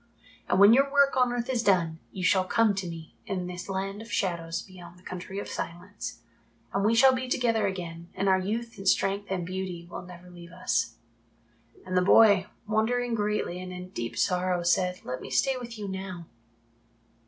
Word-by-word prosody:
And - - +3
when 200 +3 +9
your 275 +2 +4
work 280 -1 +4
on 250 -1 +3
earth 240 0 -2
is 255 -3 0
done 170 -6 +2
you 185 - -6
shall 185 0 +4
come 220 +3 +3
to 190 -2 -3
me 165 -2 -9
in 190 -4 -2
this 180 +1 -7
Land 195 +2 -3
of 225 - -11
Shadows 170 -3 -1
beyond 180 -2 -13
the 180 - -20
Country 185 +2 -7
of 200 - -4
Silence, 175 +4 -6 0.5
and 195 - +1
we 220 +3 +3
shall 260 +3 +7
be 255 0 -2
together 230 -4 +1
again 170 -3 -6
and 195 - -1
our 190 -1 +4
youth 225 +4 -3
and 195 - -5
strength 200 +2 +1
and 185 -2 -2
beauty 180 -2 -5
will - - -5
never 180 0 -12
leave 170 -1 -12
us." 115 -9 -1 0.9
And 185 0 -3
the 180 - +5
boy, 200 0 +6 0.2
wondering 230 +3 0
greatly 210 -4 -1
and 185 0 -7
in 180 0 -7
deep 120 -10 -5
sorrow, 180 -1 +1
said, 180 +1 +1
"Let 125 0 -4
me - - -8
stay 270 -1 +2
with 240 -2 -7
you 205 -1 -5
now." 190 -3 -6
190 Hz, 195 wpm, -28 LUFS, 180-220 Hz, 0.9 s, when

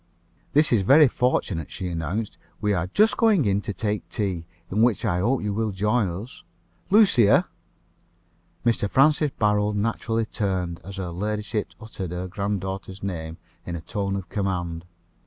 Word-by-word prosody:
"This 150 +1 +4
is 115 -4 +4
very 140 +9 +7
fortunate," 120 - 0
she 95 - -5
announced. 85 +6 -3 0.2
"We 105 -1 +1
are 90 -1 -1
just 215 - +3
going 215 - +4
in 100 0 +2
to 105 - -4
take 105 +2 -3
tea, 95 -6 -2 0.2
in 105 +3 +1
which 115 -3 +2
I 85 - +1
hope 120 +5 +1
you 105 -1 -1
will 110 +1 0
join 105 +2 +1
us. 100 +9 -7 0.5
Lucia" 195 - +5 1.2
Mr. 115 -4 +2
Francis 150 +4 +4
Barold 105 -1 +2
naturally 115 +1 -1
turned, 95 -6 -2
as 95 +2 -8
her 90 -3 -4
ladyship 105 +3 -3
uttered 110 -5 -6
her 90 +1 -4
granddaughter's 95 -1 -4
name 80 -4 -4 0.3
in 85 - -5
a 85 - -5
tone 100 +3 -3
of 95 -2 -5
command. 85 -4 -3
100 Hz, 155 wpm, -24 LUFS, 90-115 Hz, 1.2 s, very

